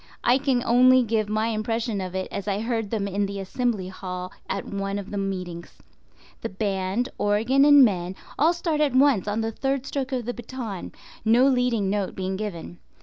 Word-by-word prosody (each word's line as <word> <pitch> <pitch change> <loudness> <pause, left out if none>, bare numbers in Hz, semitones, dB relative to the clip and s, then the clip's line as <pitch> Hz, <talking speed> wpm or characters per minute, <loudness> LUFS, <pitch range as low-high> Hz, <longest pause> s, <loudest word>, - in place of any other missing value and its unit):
I 250 +3 +4
can 260 -3 +1
only 255 +2 +6
give 220 -2 0
my 215 +1 0
impression 225 -1 -2
of 185 0 -5
it 190 0 -2
as 200 - -5
I 200 0 0
heard 225 -2 -2
them 205 -2 -1
in 200 +1 -1
the 200 0 -5
Assembly 200 -1 -2
Hall 180 -1 -6 0.2
at 195 - -2
one 195 0 -3
of 200 0 -7
the 205 - -3
meetings. 180 -3 -5 0.6
The 230 - -3
band, 195 +4 -1
organ 225 +7 +3
and 290 -2 +8
men 185 -3 -1 0.2
all 320 +5 +5
start 330 -3 -1
at 285 -4 +2
once 260 -8 +4
on 210 +2 0
the 225 0 -2
third 270 +2 -2
stroke 270 -1 -3
of 250 -3 -2
the 245 - -2
baton, 235 -5 -6 0.3
no 235 +4 +5
leading 245 -7 +1
note 200 -2 -2
being 190 0 -2
given. 185 -4 -6
215 Hz, 195 wpm, -25 LUFS, 195-250 Hz, 0.6 s, and